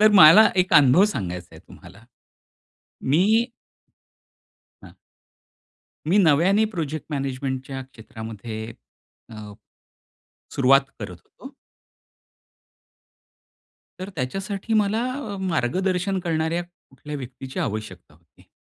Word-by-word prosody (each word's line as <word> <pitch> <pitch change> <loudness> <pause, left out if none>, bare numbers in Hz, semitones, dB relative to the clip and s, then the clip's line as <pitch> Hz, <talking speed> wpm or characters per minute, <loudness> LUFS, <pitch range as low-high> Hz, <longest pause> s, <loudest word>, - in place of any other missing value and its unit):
तर 215 0 +6
मला 185 +7 +9
एक 185 0 +1
अनुभव 145 +6 +6
सांगायच 90 - -4
आहे 80 - -12
तुम्हाला. - - -16 1.0
मी 200 - +3 1.4
हां. - - -13 1.1
मी 180 +6 +3
नव्याने 185 +5 +4
प्रोजेक्ट 155 -3 -4
मॅनेजमेंटच्या 135 -1 -4
क्षेत्रामध्ये 110 -3 -9 0.7
अ, 105 -1 -9 1.0
सुरुवात 135 +1 +5 0.2
करत 90 -4 -7
होतो. 270 +2 -14 2.5
तर 185 - -5
त्याच्यासाठी 195 - -4
मला 215 +1 +1
अ, 230 -7 -6
मार्गदर्शन 185 +4 -1
करणाऱ्या 165 +1 -1
कुठल्या 150 -4 -11
व्यक्तीची 130 0 -8
आवश्यकता 110 -7 -6
होती. 80 0 -26
150 Hz, 90 wpm, -23 LUFS, 125-190 Hz, 2.5 s, मला